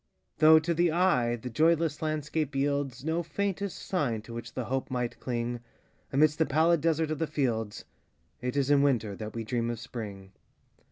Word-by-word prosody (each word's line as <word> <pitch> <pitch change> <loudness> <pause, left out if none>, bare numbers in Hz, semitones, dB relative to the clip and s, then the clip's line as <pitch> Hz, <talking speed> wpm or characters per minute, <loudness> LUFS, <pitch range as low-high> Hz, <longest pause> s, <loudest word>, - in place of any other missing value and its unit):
Though, 160 +1 +8
to 160 +2 +1
the 170 0 +2
eye, 155 -9 +2
the 120 +2 -7
joyless 160 +3 +2
landscape 155 -1 -2
yieldsNo 145 +4 -1
faintest 200 +2 -3
sign 125 - -1
to 115 - -10
which 115 0 -6
the 125 - -2
hope 130 +3 -2
might 125 -2 -3
cling,—Amidst 120 +5 -2
the 160 - +3
pallid 160 +3 +3
desert 160 -1 +1
of 155 - -2
the 160 - 0
fields,—It 125 -1 -4
is 140 0 +2
in 140 -1 +5
Winter 115 -8 +1
that 110 +2 -7
we 115 - -3
dream 115 +1 -1
of 120 -2 -3
Spring. 105 -6 -7
140 Hz, 165 wpm, -29 LUFS, 120-160 Hz, -, Though